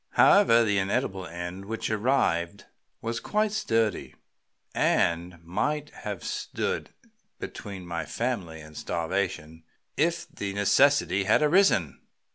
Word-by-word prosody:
However, 120 - +6
the 105 -3 +2
inedible 95 -2 -1
end 85 +3 -6
which 110 +1 -3
arrived 105 -6 0 0.4
was 115 0 -2
quite 215 0 0
sturdy, 115 - 0 0.6
and 85 +1 +1
might 145 - -2
have - - -6
stood 470 +1 -3 0.5
between 95 -3 -7
my 85 -2 -4
family 90 -4 -3
and 75 0 -13
starvation 85 -2 -3 0.3
if - - 0
the 100 -1 -5
necessity 100 -1 +3
had 110 +9 +4
arisen." 145 - +3
100 Hz, 110 wpm, -27 LUFS, 85-125 Hz, 0.6 s, However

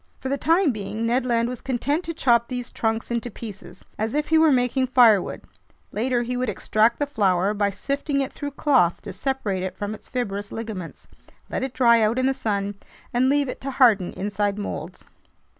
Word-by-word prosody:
For 265 - -5
the 280 - 0
time 330 -1 +3
being, 215 +1 -4
Ned 250 +2 +1
Land 235 -1 +2
was 250 -1 -6
content 275 +6 -1
to 335 - -3
chop 235 -6 +3
these 250 -1 -5
trunks 225 +1 -2
into 235 +1 -2
pieces, 210 -2 -10
as 220 +4 -1
if 300 0 -1
he 320 - +5
were 320 -1 +5
making 255 0 +2
firewood; 240 -6 +4 0.5
later 240 +2 0
he 250 +1 -3
would 250 -1 -1
extract 215 +3 +2
the 290 - 0
flour 200 -7 +1
by 205 -1 +1
sifting 280 - -2
it 270 -1 -2
through 290 - -5
cloth 255 - +3
to - - -7
separate 260 -9 -2
it 185 0 -4
from 205 +1 -3
its 215 - -12
fibrous 205 -5 -3
ligaments, 215 -7 -7 0.4
let - - -2
it 265 -1 -4
dry 235 -3 +5
out 220 +3 +2
in 255 - +1
the 270 - +3
sun, 205 -5 -2 0.3
and 250 +2 +3
leave 285 0 +2
it 250 - -6
to 275 - -4
harden 230 -9 +4
inside 205 +1 -2
molds. 205 - -6
235 Hz, 200 wpm, -24 LUFS, 210-265 Hz, 0.5 s, he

